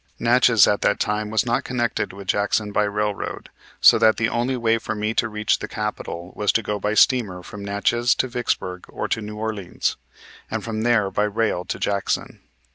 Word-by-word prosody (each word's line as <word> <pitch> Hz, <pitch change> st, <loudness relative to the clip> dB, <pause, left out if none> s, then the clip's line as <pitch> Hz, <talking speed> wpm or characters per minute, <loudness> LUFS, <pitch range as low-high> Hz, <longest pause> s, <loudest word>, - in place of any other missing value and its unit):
Natchez 120 Hz, -2 st, +5 dB
at 105 Hz, -, +1 dB
that -, -, +2 dB
time 105 Hz, 0 st, -1 dB
was 110 Hz, +2 st, +1 dB
not 120 Hz, 0 st, 0 dB
connected 120 Hz, -4 st, -1 dB
with 100 Hz, 0 st, -11 dB
Jackson 105 Hz, +1 st, 0 dB
by 105 Hz, +1 st, +2 dB
railroad, 105 Hz, 0 st, -3 dB, 0.3 s
so -, -, +7 dB
that 110 Hz, 0 st, +4 dB
the 115 Hz, -, +1 dB
only 125 Hz, +2 st, -1 dB
way 115 Hz, -1 st, +1 dB
for 110 Hz, -, -4 dB
me 105 Hz, +1 st, -1 dB
to 115 Hz, 0 st, +1 dB
reach 105 Hz, 0 st, 0 dB
the -, -, -5 dB
capital 95 Hz, -4 st, -5 dB
was 105 Hz, -1 st, +1 dB
to 115 Hz, -, +1 dB
go 105 Hz, 0 st, -2 dB
by 105 Hz, +2 st, -1 dB
steamer 105 Hz, -8 st, +3 dB
from 105 Hz, +2 st, -9 dB
Natchez 110 Hz, +5 st, +1 dB
to -, -, 0 dB
Vicksburg 115 Hz, -7 st, -3 dB
or -, -, -4 dB
to 115 Hz, -, -1 dB
New 105 Hz, 0 st, -7 dB
Orleans, 105 Hz, -4 st, -3 dB, 0.5 s
and -, -, -3 dB
from 110 Hz, -1 st, -3 dB
there 110 Hz, -4 st, +2 dB
by 105 Hz, -, +1 dB
rail 105 Hz, -4 st, -1 dB
to -, -, -4 dB
Jackson. 100 Hz, -1 st, -2 dB
105 Hz, 200 wpm, -22 LUFS, 105-115 Hz, 0.5 s, so